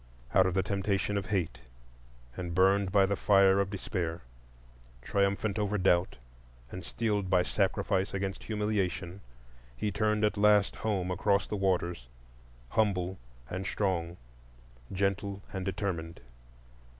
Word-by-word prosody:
Out 95 Hz, 0 st, +5 dB
of 95 Hz, -, -1 dB
the 95 Hz, -, +2 dB
temptation 100 Hz, 0 st, -1 dB
of 100 Hz, -2 st, -2 dB
Hate, 95 Hz, -6 st, -1 dB, 0.8 s
and 85 Hz, -2 st, -5 dB
burned 95 Hz, +1 st, +3 dB
by 100 Hz, -1 st, +5 dB
the 100 Hz, +1 st, 0 dB
fire 100 Hz, 0 st, +5 dB
of 100 Hz, -1 st, +1 dB
Despair, 90 Hz, -4 st, -3 dB, 0.8 s
triumphant 100 Hz, -, 0 dB
over 105 Hz, 0 st, 0 dB
Doubt, 90 Hz, -1 st, +2 dB, 0.5 s
and 90 Hz, -, -7 dB
steeled 105 Hz, -5 st, -1 dB
by 90 Hz, -1 st, +4 dB
Sacrifice 95 Hz, 0 st, 0 dB
against 95 Hz, 0 st, -4 dB
Humiliation, 100 Hz, -4 st, -2 dB, 0.6 s
he 105 Hz, -, -1 dB
turned 105 Hz, +1 st, +1 dB
at 105 Hz, -1 st, 0 dB
last 105 Hz, -1 st, +4 dB
home 95 Hz, -5 st, -1 dB
across 100 Hz, +1 st, +2 dB
the -, -, -4 dB
waters, 90 Hz, -9 st, -1 dB, 0.6 s
humble 95 Hz, -2 st, 0 dB, 0.3 s
and 95 Hz, +5 st, -4 dB
strong, 90 Hz, -5 st, -1 dB, 0.7 s
gentle 100 Hz, +1 st, -1 dB
and 95 Hz, -1 st, -3 dB
determined. 90 Hz, -4 st, -3 dB
95 Hz, 125 wpm, -30 LUFS, 90-100 Hz, 0.8 s, Out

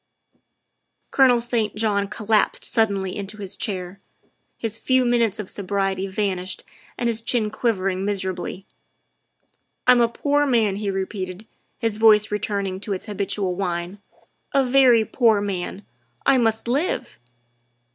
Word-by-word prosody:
Colonel 255 Hz, -3 st, +5 dB
St. 230 Hz, -3 st, -1 dB
John 210 Hz, -2 st, +1 dB
collapsed 210 Hz, +1 st, +1 dB
suddenly 200 Hz, -5 st, +1 dB
into 205 Hz, +1 st, -5 dB
his 195 Hz, -1 st, -4 dB
chair, 185 Hz, -2 st, -4 dB, 0.6 s
his 225 Hz, -2 st, -3 dB
few 260 Hz, -1 st, +2 dB
minutes 235 Hz, -4 st, +2 dB
of 210 Hz, -, -5 dB
sobriety 195 Hz, -1 st, -1 dB
vanished 190 Hz, -2 st, -2 dB, 0.3 s
and 240 Hz, -, -1 dB
his 230 Hz, -1 st, 0 dB
chin 225 Hz, -2 st, 0 dB
quivering 195 Hz, -5 st, -1 dB
miserably. 190 Hz, -1 st, -3 dB, 0.6 s
" -, -, -49 dB
I'm 250 Hz, -1 st, +6 dB
a 235 Hz, -, +3 dB
poor 290 Hz, +4 st, +1 dB
man," 220 Hz, -6 st, +2 dB
he 205 Hz, -1 st, -2 dB
repeated, 190 Hz, 0 st, -4 dB, 0.3 s
his 225 Hz, -3 st, -1 dB
voice 215 Hz, -1 st, +5 dB
returning 200 Hz, -2 st, -2 dB
to 205 Hz, 0 st, -3 dB
its 185 Hz, -, -5 dB
habitual 200 Hz, -2 st, -2 dB
whine, 180 Hz, +1 st, -3 dB, 0.3 s
" -, -, -37 dB
a 275 Hz, -1 st, +4 dB
very 250 Hz, -3 st, +5 dB
poor 225 Hz, -4 st, +3 dB
man. 200 Hz, 0 st, -4 dB, 0.4 s
I 265 Hz, -, +5 dB
must 225 Hz, -1 st, 0 dB
live." 265 Hz, -1 st, -1 dB
210 Hz, 135 wpm, -23 LUFS, 195-230 Hz, 0.6 s, I'm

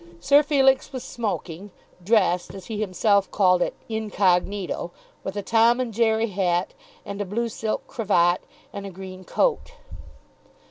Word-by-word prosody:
Sir 280 Hz, +10 st, +5 dB
Felix 270 Hz, -3 st, +2 dB
was 260 Hz, -2 st, -6 dB
smoking, 205 Hz, -4 st, -4 dB, 0.3 s
dressed, 185 Hz, -3 st, +2 dB
as 190 Hz, -, -9 dB
he 220 Hz, -2 st, -5 dB
himself 200 Hz, 0 st, +2 dB
called 185 Hz, -3 st, +3 dB
it, -, -, -1 dB
"incognito," 200 Hz, -4 st, 0 dB, 0.3 s
with 195 Hz, +1 st, -5 dB
a 205 Hz, -, -2 dB
Tom 230 Hz, +3 st, +4 dB
and 245 Hz, -3 st, -2 dB
Jerry 225 Hz, 0 st, +2 dB
hat, 180 Hz, -2 st, 0 dB, 0.3 s
and 200 Hz, 0 st, -5 dB
a -, -, +1 dB
blue 230 Hz, +5 st, -2 dB
silk 220 Hz, 0 st, -3 dB
cravat, 180 Hz, -7 st, +2 dB, 0.3 s
and 200 Hz, 0 st, -6 dB
a -, -, -6 dB
green 185 Hz, 0 st, -9 dB
coat. -, -, 0 dB
205 Hz, 145 wpm, -24 LUFS, 185-230 Hz, 0.3 s, Sir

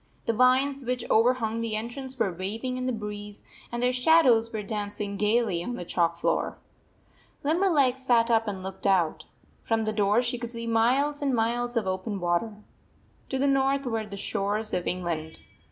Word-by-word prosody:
The 230 Hz, -, +1 dB
vines 260 Hz, +3 st, +3 dB
which 250 Hz, -1 st, -2 dB
overhung 230 Hz, -1 st, +2 dB
the 225 Hz, -2 st, -2 dB
entrance 255 Hz, +4 st, -5 dB
were 195 Hz, -6 st, 0 dB
waving 220 Hz, +8 st, -4 dB
in 255 Hz, 0 st, -3 dB
the -, -, +1 dB
breeze, 210 Hz, -2 st, -6 dB, 0.3 s
and 240 Hz, 0 st, -3 dB
their 250 Hz, 0 st, +2 dB
shadows 250 Hz, -4 st, +4 dB
were 215 Hz, -2 st, -4 dB
dancing 205 Hz, 0 st, -4 dB
gayly 210 Hz, -4 st, +1 dB
on 245 Hz, +6 st, -4 dB
the 175 Hz, -, -6 dB
chalk 170 Hz, -1 st, +1 dB
floor. 170 Hz, -, -1 dB, 0.9 s
Limberleg 300 Hz, -5 st, +2 dB
sat 240 Hz, -3 st, +2 dB
up 225 Hz, -1 st, +3 dB
and 195 Hz, -2 st, -4 dB
looked 190 Hz, +1 st, -4 dB
out. 180 Hz, -5 st, +2 dB, 0.4 s
From 225 Hz, -1 st, 0 dB
the 215 Hz, -, -1 dB
door 210 Hz, +3 st, +2 dB
she 245 Hz, 0 st, -2 dB
could 235 Hz, -1 st, -5 dB
see 230 Hz, -1 st, -4 dB
miles 255 Hz, +6 st, +2 dB
and 275 Hz, -3 st, +1 dB
miles 240 Hz, +1 st, 0 dB
of 225 Hz, -, +1 dB
open 190 Hz, +2 st, -3 dB
water. 195 Hz, +5 st, -1 dB, 0.7 s
To 265 Hz, -, -1 dB
the 270 Hz, -, +1 dB
north 275 Hz, 0 st, +2 dB
were 225 Hz, -3 st, -2 dB
the 200 Hz, -1 st, -7 dB
shores 205 Hz, +2 st, -2 dB
of 175 Hz, -, -1 dB
England. 170 Hz, -3 st, -3 dB
225 Hz, 180 wpm, -27 LUFS, 205-255 Hz, 0.9 s, shadows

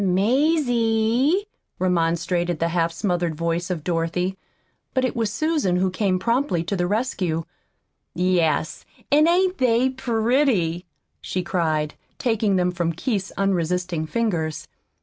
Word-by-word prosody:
"Mazie!" 240 Hz, -, +2 dB, 0.3 s
remonstrated 175 Hz, -1 st, 0 dB
the 165 Hz, +2 st, 0 dB
half 170 Hz, -1 st, +1 dB
smothered 175 Hz, -2 st, -1 dB
voice 170 Hz, +2 st, -2 dB
of 170 Hz, -5 st, -3 dB
Dorothy. 175 Hz, +2 st, -1 dB, 0.6 s
But 260 Hz, 0 st, +2 dB
it 255 Hz, -, -2 dB
was 225 Hz, -3 st, 0 dB
Susan 300 Hz, -, 0 dB
who 185 Hz, +1 st, +1 dB
came 185 Hz, -1 st, +1 dB
promptly 230 Hz, -, 0 dB
to 185 Hz, +4 st, -2 dB
the 175 Hz, -1 st, 0 dB
rescue. 185 Hz, -7 st, -1 dB, 0.7 s
"Yes, 170 Hz, -3 st, +1 dB, 0.3 s
an' 300 Hz, +2 st, +5 dB
ain't 365 Hz, +2 st, +2 dB
they 250 Hz, +1 st, +3 dB
pretty?" 225 Hz, -, +1 dB, 0.3 s
she 185 Hz, -, -3 dB
cried, 155 Hz, -4 st, 0 dB, 0.2 s
taking 220 Hz, -4 st, +1 dB
them 180 Hz, -1 st, +2 dB
from 170 Hz, -1 st, -1 dB
Keith's 195 Hz, +2 st, -2 dB
unresisting 180 Hz, -3 st, 0 dB
fingers. 160 Hz, -8 st, -2 dB
185 Hz, 125 wpm, -23 LUFS, 170-235 Hz, 0.7 s, an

